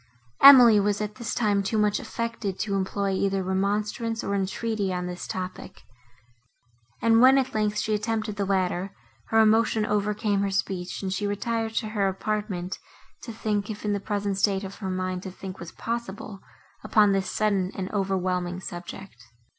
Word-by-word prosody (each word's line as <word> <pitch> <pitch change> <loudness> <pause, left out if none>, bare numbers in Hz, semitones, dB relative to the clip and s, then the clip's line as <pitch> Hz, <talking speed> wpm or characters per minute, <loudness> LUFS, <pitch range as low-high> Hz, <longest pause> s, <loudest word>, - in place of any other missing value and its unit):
Emily 245 -6 +10
was, 205 0 +1
at 210 0 -4
this 230 - -3
time, 205 -3 +2
too 200 +3 -1
much 210 -1 +2
affected 230 -4 -4
to 205 - -2
employ 195 +1 -1
either 195 0 0
remonstrance, 210 +4 -1
or 200 - -2
entreaty 200 +1 -1
on 180 0 -2
this 180 0 -6
topic; 185 +1 -6 1.2
and 230 0 +5
when, 260 +2 +7
at 265 -1 0
length, 210 -1 0
she 215 0 0
attempted 215 0 -2
the 205 - -1
latter, 190 -1 -1 0.3
her 225 - +3
emotion 220 0 +3
overcame 210 -1 0
her 200 - 0
speech, 190 -1 -3
and 190 -1 -2
she 205 +2 -2
retired 225 +2 -2
to 215 - -1
her 205 -2 0
apartment, 195 -2 -3 0.4
to 235 - -7
think, 210 -2 -2
if 210 0 -6
in 205 - +1
the 200 - -1
present 200 -1 -2
state 195 -1 +1
of 195 0 -7
her 195 -3 -4
mind 185 0 -2
to 190 - -6
think 185 0 -9
was 170 -1 -8
possible, 215 -3 -5 0.4
upon 210 -2 +4
this 195 -1 0
sudden 200 -3 0
and 190 -2 -4
overwhelming 185 -3 -1
subject. 185 +2 -9
200 Hz, 170 wpm, -26 LUFS, 190-215 Hz, 1.2 s, Emily